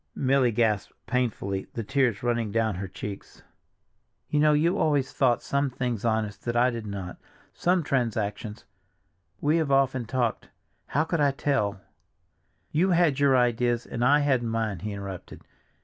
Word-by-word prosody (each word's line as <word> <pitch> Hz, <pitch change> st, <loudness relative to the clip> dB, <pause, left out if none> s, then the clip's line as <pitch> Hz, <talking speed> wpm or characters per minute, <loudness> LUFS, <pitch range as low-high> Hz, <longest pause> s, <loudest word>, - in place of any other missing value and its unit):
Milly 130 Hz, -2 st, +2 dB
gasped 110 Hz, -3 st, 0 dB
painfully, 110 Hz, -6 st, -2 dB
the 115 Hz, -, -2 dB
tears 125 Hz, -3 st, 0 dB
were 120 Hz, -, +1 dB
running 115 Hz, -3 st, -1 dB
down 110 Hz, 0 st, +1 dB
her 95 Hz, +2 st, -5 dB
cheeks. 100 Hz, +2 st, -8 dB, 0.9 s
"You 150 Hz, -, +1 dB
know 150 Hz, 0 st, +5 dB
you 165 Hz, +6 st, +2 dB
always 145 Hz, -4 st, +1 dB
thought 125 Hz, -4 st, +2 dB
some 140 Hz, 0 st, 0 dB
things 125 Hz, -4 st, -3 dB
honest 110 Hz, -3 st, -1 dB
that 120 Hz, 0 st, -2 dB
I 125 Hz, +2 st, +4 dB
did 115 Hz, -2 st, -6 dB
not—some 100 Hz, -, -3 dB
transactions—we 105 Hz, -, -3 dB
have 155 Hz, -4 st, 0 dB
often 135 Hz, -2 st, +2 dB
talked—how 125 Hz, +4 st, -3 dB
could 165 Hz, -1 st, -1 dB
I 145 Hz, -, +4 dB
tell—" 135 Hz, -8 st, -1 dB, 0.9 s
"You 175 Hz, +5 st, +2 dB
had 170 Hz, -6 st, +3 dB
your 140 Hz, -2 st, +4 dB
ideas 120 Hz, 0 st, +1 dB
and 120 Hz, -, -3 dB
I 145 Hz, +4 st, +5 dB
had 135 Hz, -4 st, +2 dB
mine," 115 Hz, -5 st, -2 dB
he 105 Hz, +5 st, -5 dB
interrupted. 100 Hz, -3 st, -8 dB
120 Hz, 150 wpm, -26 LUFS, 105-140 Hz, 0.9 s, know